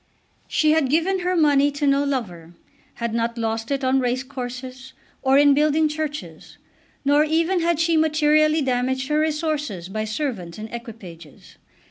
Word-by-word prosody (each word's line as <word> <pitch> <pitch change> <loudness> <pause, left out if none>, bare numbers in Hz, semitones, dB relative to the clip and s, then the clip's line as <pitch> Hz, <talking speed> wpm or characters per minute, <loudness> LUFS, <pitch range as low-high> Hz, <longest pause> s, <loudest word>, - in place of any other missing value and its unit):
She 310 -1 +2
had 310 -4 +2
given 340 +6 +1
her 365 0 -1
money 290 -3 +4
to 285 +1 -2
no 280 0 +3
lover, 180 -12 -4 0.4
had 235 -1 -3
not 235 0 -1
lost 225 0 -3
it 275 -1 -2
on 260 +1 +2
race 250 +1 -1
courses, 255 0 -8 0.3
or 265 +1 +3
in 285 0 +6
building 305 +2 +2
churches; 305 0 -6 0.5
nor 290 +2 +4
even 330 +4 +1
had 335 -1 0
she 330 0 +2
materially 310 0 +3
damaged 260 +1 -1
her 300 0 +2
resources 300 - -2
by 215 +2 -3
servants 215 - -4
and 215 +1 -8
equipages. 195 - -11
275 Hz, 155 wpm, -22 LUFS, 235-305 Hz, 0.5 s, in